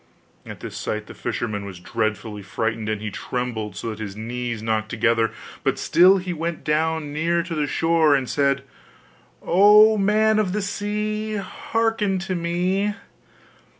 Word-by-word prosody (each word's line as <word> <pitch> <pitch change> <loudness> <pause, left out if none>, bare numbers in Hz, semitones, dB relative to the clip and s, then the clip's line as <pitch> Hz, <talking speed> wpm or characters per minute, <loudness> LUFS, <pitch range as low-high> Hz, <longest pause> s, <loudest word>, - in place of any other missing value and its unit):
At - - -9
this - - -7
sight 105 0 -3
the - - -11
fisherman 105 -3 -3
was 95 -3 -8
dreadfully 110 +1 -3
frightened, 110 +3 -2
and 105 -1 -2
he 105 - -3
trembled 110 -3 -4
so 115 - -4
that 110 - -8
his 100 -2 -6
knees 120 0 -4
knocked 110 -1 -1
together: 115 0 +2 0.3
but - - +1
still 185 +3 +5
he 180 -1 -3
went 165 0 -4
down 155 -1 0
near 170 +3 +1
to 170 -1 -6
the 150 -2 0
shore, 165 -1 +3
and 135 -2 -1
said: 140 -1 +1 0.8
'O 210 +4 +6
man 215 +2 +3
of 190 -4 0
the 210 - 0
sea! 210 +1 -2
Hearken 210 +1 -1
to 190 0 -3
me! 180 +4 0
155 Hz, 155 wpm, -23 LUFS, -, 0.8 s, O